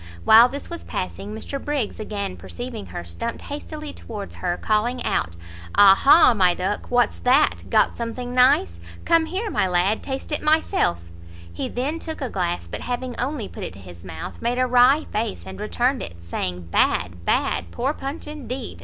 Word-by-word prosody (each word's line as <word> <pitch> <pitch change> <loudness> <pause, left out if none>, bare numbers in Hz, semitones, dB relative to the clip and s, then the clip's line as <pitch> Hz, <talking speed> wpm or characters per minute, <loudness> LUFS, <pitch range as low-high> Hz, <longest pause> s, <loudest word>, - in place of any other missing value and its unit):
While 230 +3 +8
this 280 +2 -6
was 340 -1 -6
passing, 195 +2 -5
Mr 245 +6 -6
Briggs, 285 -9 -2
again 200 -3 -4
perceiving 240 -4 -7
her, - - -6
stumpt 85 - -5
hastily 300 +1 -7
towards 210 -3 -8
her, 175 -1 -2
calling 230 +4 0
out 85 +1 -1 0.4
"Ah 200 -1 +9
ha! 275 +5 +6
my 180 -5 +3
duck! 190 +3 -3
what's 245 0 +2
that? 265 +5 +2
got - - +3
something 245 +1 -5
nice? 95 - +4 0.3
Come 330 -1 +3
here, 395 +6 -3
my - - +1
lad, 185 +4 +1
taste 270 +3 -5
it 300 - -1
myself." 305 - +2 0.6
He - - -4
then 285 +7 -2
took 320 -1 -6
a 265 -5 -4
glass, 175 - -2
but 85 - -6
having 245 0 -3
only 255 -4 -2
put - - -8
it - - -5
to 95 - -12
his 90 -2 -12
mouth, 80 - -8
made 240 +1 0
a 255 - +3
wry 255 +4 +5
face, 215 -1 -3
and - - -8
returned 245 +5 0
it, 85 - -7
saying 90 0 -4
"Bad! 85 -1 +1
bad! 85 0 0
poor 265 - -1
punch 275 +2 -6
indeed! 265 -5 -6
240 Hz, 180 wpm, -23 LUFS, 185-275 Hz, 0.6 s, Ah